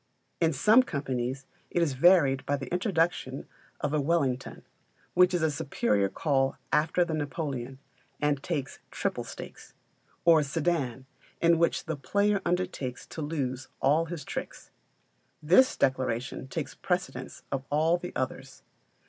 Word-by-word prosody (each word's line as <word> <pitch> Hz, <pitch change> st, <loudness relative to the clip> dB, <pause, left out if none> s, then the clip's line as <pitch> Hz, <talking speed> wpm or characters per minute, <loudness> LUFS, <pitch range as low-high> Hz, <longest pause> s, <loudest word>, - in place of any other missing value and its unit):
In 165 Hz, -1 st, +3 dB
some 215 Hz, -, +5 dB
companies 135 Hz, -, -3 dB, 0.2 s
it -, -, 0 dB
is 150 Hz, -5 st, 0 dB
varied 140 Hz, -2 st, +5 dB
by 145 Hz, -, +1 dB
the 135 Hz, -2 st, -7 dB
introduction 175 Hz, -, 0 dB, 0.3 s
of 145 Hz, 0 st, -1 dB
a 150 Hz, -, +2 dB
Wellington, 135 Hz, -5 st, -1 dB, 0.5 s
which 180 Hz, 0 st, +5 dB
is 175 Hz, -3 st, 0 dB
a 160 Hz, -, +3 dB
superior 120 Hz, -9 st, 0 dB
call 135 Hz, 0 st, 0 dB, 0.2 s
after 160 Hz, +4 st, +3 dB
the 165 Hz, -, -3 dB
Napoleon, 140 Hz, -4 st, -3 dB, 0.4 s
and 145 Hz, -2 st, +1 dB
takes 145 Hz, -6 st, -3 dB
triple -, -, -2 dB
stakes; -, -, -10 dB, 0.5 s
or 165 Hz, -2 st, +7 dB
a -, -, +1 dB
Sedan, 140 Hz, -4 st, -1 dB, 0.3 s
in 170 Hz, -1 st, +4 dB
which 170 Hz, -, +1 dB
the 160 Hz, -, -2 dB
player 200 Hz, +8 st, +1 dB
undertakes 175 Hz, -8 st, -2 dB
to 160 Hz, -, -7 dB
lose 135 Hz, -4 st, -3 dB
all 150 Hz, +5 st, +3 dB
his 165 Hz, -4 st, -6 dB
tricks. -, -, -6 dB, 0.7 s
This 180 Hz, +13 st, +5 dB
declaration 130 Hz, -1 st, -1 dB
takes -, -, -4 dB
precedence -, -, -3 dB
of 135 Hz, -1 st, -2 dB
all 160 Hz, +4 st, +3 dB
the 180 Hz, 0 st, -7 dB
others. 130 Hz, 0 st, -4 dB
150 Hz, 140 wpm, -28 LUFS, 135-170 Hz, 0.7 s, or